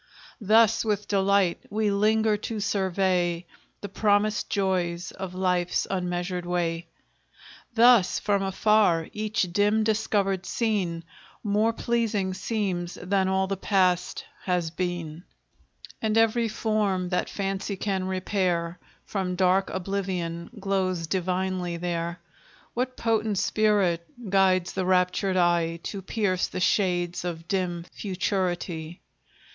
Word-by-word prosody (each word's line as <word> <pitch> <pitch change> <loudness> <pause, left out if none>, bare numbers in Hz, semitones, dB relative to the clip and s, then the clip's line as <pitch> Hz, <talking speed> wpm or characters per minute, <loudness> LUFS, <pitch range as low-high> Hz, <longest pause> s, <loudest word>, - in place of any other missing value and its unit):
Thus 220 +1 +4
with 210 -2 -1
delight 195 -2 +2
we 215 0 0
linger 215 +2 +3
to 215 +1 -4
survey 185 -4 0 0.4
The 205 - -6
promised 210 +1 +1
joys 180 -3 -1
of 190 -1 -7
life's 180 -1 +1
unmeasured 180 -1 -2
way; 170 -1 -2 0.9
Thus, 230 -5 +6
from 200 -1 +1
afar, 195 -3 +2
each 210 -4 -1
dim 210 +3 +3
discovered 205 -3 0
scene 190 -8 -1 0.4
More 210 +2 +2
pleasing 225 -5 -1
seems 185 -4 -2
than 190 +1 0
all 190 0 +1
the 195 +1 -2
past 185 -2 +1 0.2
hath 175 -3 -1
been, 175 -3 -3 0.8
And 220 0 +1
every 225 +1 +3
form 210 -4 0
that 180 - -1
Fancy 195 0 -3
can 190 -2 -1
repair 185 -2 -1 0.3
From 185 -3 -2
dark 185 +1 +2
oblivion 180 -3 -3
glows 190 -3 0
divinely 180 0 -1
there. 170 0 -3 0.5
What 255 +1 -2
potent 220 -3 0
spirit 200 -4 +2 0.3
guides 185 -2 +3
the 190 - -1
raptured 185 +1 +2
eye 170 -1 +2
To 200 - -5
pierce 190 -2 0
the - - -5
shades 180 -2 +1
of 170 -2 -5
dim 175 -3 -1
futurity? 180 -4 -2
190 Hz, 115 wpm, -26 LUFS, 175-205 Hz, 0.9 s, Thus